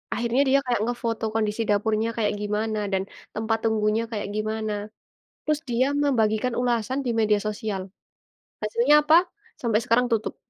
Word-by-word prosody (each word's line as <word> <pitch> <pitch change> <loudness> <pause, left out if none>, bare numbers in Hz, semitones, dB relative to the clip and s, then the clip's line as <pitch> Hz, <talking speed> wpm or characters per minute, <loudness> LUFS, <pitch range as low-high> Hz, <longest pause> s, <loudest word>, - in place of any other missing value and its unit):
akhirnya 240 +2 +1
dia 275 +1 +5
kayak 245 -3 +1
ngefoto 230 -1 -2
kondisi 215 0 0
dapurnya 215 +2 +1
kayak 215 -2 +1
gimana, 210 +1 -1
dan 190 -1 +1 0.3
tempat 225 +1 0
tunggunya 220 0 +1
kayak 210 -2 -3
gimana, 215 0 -2 0.7
terus 305 -1 0
dia 240 +2 +2 0.2
membagikan 230 -3 +1
ulasan 245 +2 0
di - - 0
media 210 -1 +3
sosial, 210 -3 -3 0.8
hasilnya 235 +7 +3
apa? 310 +2 +5 0.4
Sampai 230 -3 +2
sekarang 245 +1 +2
tutup. 220 -1 0
225 Hz, 145 wpm, -25 LUFS, 215-240 Hz, 0.8 s, dia